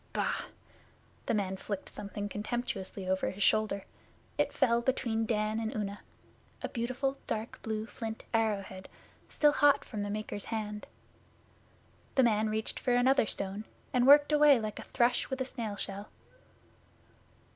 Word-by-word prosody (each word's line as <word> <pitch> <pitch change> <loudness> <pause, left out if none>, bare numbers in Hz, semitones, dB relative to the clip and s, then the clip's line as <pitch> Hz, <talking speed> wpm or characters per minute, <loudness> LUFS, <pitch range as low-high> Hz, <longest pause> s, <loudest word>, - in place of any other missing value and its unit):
Bah!' - - -1 0.8
The - - +2
man 190 -2 -1
flicked 200 0 -5
something 205 0 -5
contemptuously 205 -3 -4
over 190 0 +1
his 195 +1 -2
shoulder. 215 -2 +2 0.5
It - - +1
fell 235 -3 +3
between 230 -3 0
Dan 215 0 0
and 225 -1 -3
Una 205 -1 -3 0.6
a - - -2
beautiful 255 +3 -2
dark 220 +1 -4
blue 220 -1 -2
flint 225 -1 -6
arrow 220 -3 +2
head 190 0 -10 0.4
still 295 -1 +4
hot 290 0 +4
from 215 -3 -5
the 205 - -2
maker's 210 -1 -4
hand. 210 -2 -4 1.3
The 265 - +5
man 215 -2 +3
reached 220 0 -2
for 245 - +1
another 255 -1 +4
stone, 200 +2 -2 0.3
and 250 0 +3
worked 290 +1 +8
away 295 -3 +6
like 215 -1 -4
a - - -6
thrush 240 +4 +1
with 265 -1 -3
a 260 - 0
snail 225 -5 -4
shell. 200 +1 -5
220 Hz, 150 wpm, -31 LUFS, 205-245 Hz, 1.3 s, worked